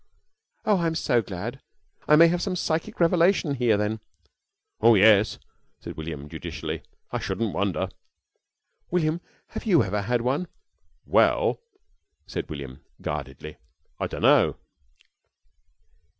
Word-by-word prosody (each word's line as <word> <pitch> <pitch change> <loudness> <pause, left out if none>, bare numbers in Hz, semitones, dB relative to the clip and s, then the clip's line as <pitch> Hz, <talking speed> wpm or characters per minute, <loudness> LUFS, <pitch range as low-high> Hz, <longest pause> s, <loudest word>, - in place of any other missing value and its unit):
"Oh, 205 -3 +3
I'm 165 -1 0
so 125 -7 +2
glad. 90 -5 -6 0.5
I 150 - +7
may 165 +2 +8
have 175 +1 0
some 190 -1 -1
psychic 160 -2 -2
revelation 170 -2 +3
here, 120 -5 +2
then?" 105 +1 -1 0.8
"Oh 115 +1 +7
yes," 105 +1 +5 0.4
said - - -8
William, 80 -2 -6
judicially. - - -5 0.3
"I - - -1
shouldn't 115 -3 -2
wonder." 95 -1 0 1.0
"William, 165 -1 0 0.3
have - - -7
you 175 -7 +5
ever 100 +2 -1
had 120 +3 0
one?" 135 +9 -1 0.6
"Well," - - +3 0.7
said - - -5
William, 70 -4 -7 0.2
guardedly, 70 +3 -6 0.4
"I - - -1
dunno." - - +3
120 Hz, 120 wpm, -25 LUFS, -, 1.0 s, may